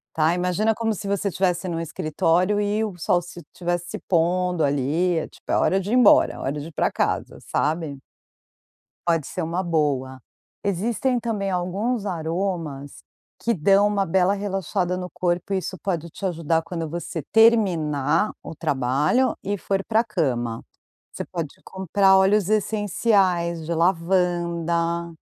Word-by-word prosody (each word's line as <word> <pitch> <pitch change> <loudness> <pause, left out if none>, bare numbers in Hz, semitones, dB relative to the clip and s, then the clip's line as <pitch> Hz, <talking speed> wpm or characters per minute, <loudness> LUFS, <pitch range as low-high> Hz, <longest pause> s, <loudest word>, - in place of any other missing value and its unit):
Tá, 160 +2 +3
imagina 180 +5 +1
como 225 -1 0
se 200 0 -6
você 200 0 -1
tivesse 180 0 0
num 165 -1 -2
escritório 165 +5 +1
e 210 +2 0
o 200 -5 -4
sol 175 +1 +1
se 175 0 -10
tivesse 175 -1 -3
se - - -4
pondo 180 0 +1
ali. 150 +5 +1
É - - -4
tipo - - -21
é - - +2
hora 190 - +2
de 195 +2 -4
ir - - +1
embora, 250 -4 +5
hora 135 - -1
de 150 - -7
ir 165 - -12
para - - +1
casa, - - -2
sabe. 150 -3 -2 1.0
Pode 165 -4 +1
ser 185 - -4
uma 170 +4 -2
boa. 140 -6 -1 0.4
Existem 230 +6 0
também 215 -4 -2
alguns 195 +6 -1
aromas 165 -5 -3 0.4
que 235 - +1
dão 195 +4 +4
uma 200 -1 +1
bela 190 +3 +2
relaxada 195 -2 -2
no 180 0 -5
corpo 175 +2 -1
e 195 - +2
isso 185 0 -4
pode 170 -4 -2
te - - -13
ajudar 165 -2 0
quando 165 -1 -5
você 170 -1 -5
terminar 175 - +3
o - - -7
trabalho 145 - +1
e 205 +1 -2
for 195 +1 -1
para 225 0 +2
a - - -5
cama, 125 - -2 0.5
você - - -6
pode 165 -5 -5
comprar 190 +1 +3
óleos 195 0 +3
essenciais 195 -5 +1
de 170 - -2
lavanda, 170 -1 0
180 Hz, 155 wpm, -23 LUFS, 165-200 Hz, 1.0 s, embora